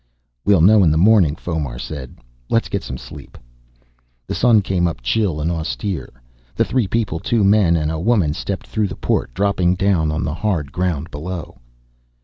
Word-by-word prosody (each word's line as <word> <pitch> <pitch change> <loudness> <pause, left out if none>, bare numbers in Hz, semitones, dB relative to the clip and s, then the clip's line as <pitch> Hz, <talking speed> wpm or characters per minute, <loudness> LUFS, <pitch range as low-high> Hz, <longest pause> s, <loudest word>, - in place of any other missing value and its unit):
"We'll 100 -5 +4
know 105 +3 +6
in 85 - +5
the 75 - +2
morning," 90 -4 +4
Fomar 75 -8 -4
said. 65 -2 -7 0.3
"Let's - - +1
get - - -2
some 65 - -6
sleep." - - -12 0.9
The - - -4
sun 115 -4 +4
came 90 -2 +1
up 70 -8 -5
chill 95 - 0
and 80 +3 -1
austere. 85 +3 -3 0.5
The - - +2
three 125 -6 0
people, 105 -6 -1
two 110 +4 +1
men 100 -4 +4
and 75 -1 0
a 80 - -3
woman, 95 -6 +2
stepped 100 +4 -4
through 110 -2 -1
the 85 - -7
port, - - -1
dropping 95 -2 +1
down 90 -5 +1
on 75 - -2
the 75 - -2
hard 85 -6 -2
ground 85 -3 -2
below. 80 -2 -7
85 Hz, 180 wpm, -19 LUFS, 75-100 Hz, 0.9 s, know